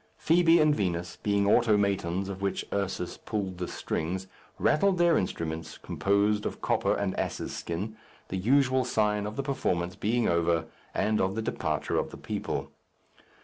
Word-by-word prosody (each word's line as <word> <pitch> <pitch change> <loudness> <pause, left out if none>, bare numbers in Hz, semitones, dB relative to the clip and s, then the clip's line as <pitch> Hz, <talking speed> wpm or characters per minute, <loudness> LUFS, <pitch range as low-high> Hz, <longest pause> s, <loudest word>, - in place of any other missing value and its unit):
Fibi 170 0 +5
and 155 -1 +5
Vinos, 85 - -2
being 100 -1 +2
automatons 100 -4 +2
of 100 -1 -6
which 100 0 -1
Ursus 95 -3 -2
pulled 95 -4 -4
the 90 - -2
strings, 90 +4 -3 0.3
rattled 190 +4 +3
their 175 -1 +4
instruments, 80 - -3
composed 100 +1 +1
of - - -6
copper - - +1
and - - -1
ass's - - -3
skin 100 +6 -4 0.3
the 95 - -2
usual 130 +5 +3
sign 105 -3 +1
of 105 - -6
the 140 - -2
performance 90 -10 -1
being 115 +3 +1
over 85 -1 +2 0.3
and 110 0 +2
of 95 +1 0
the 110 - -1
departure - - -1
of - - -2
the - - -10
people. - - -4
100 Hz, 155 wpm, -28 LUFS, 90-120 Hz, 0.3 s, Fibi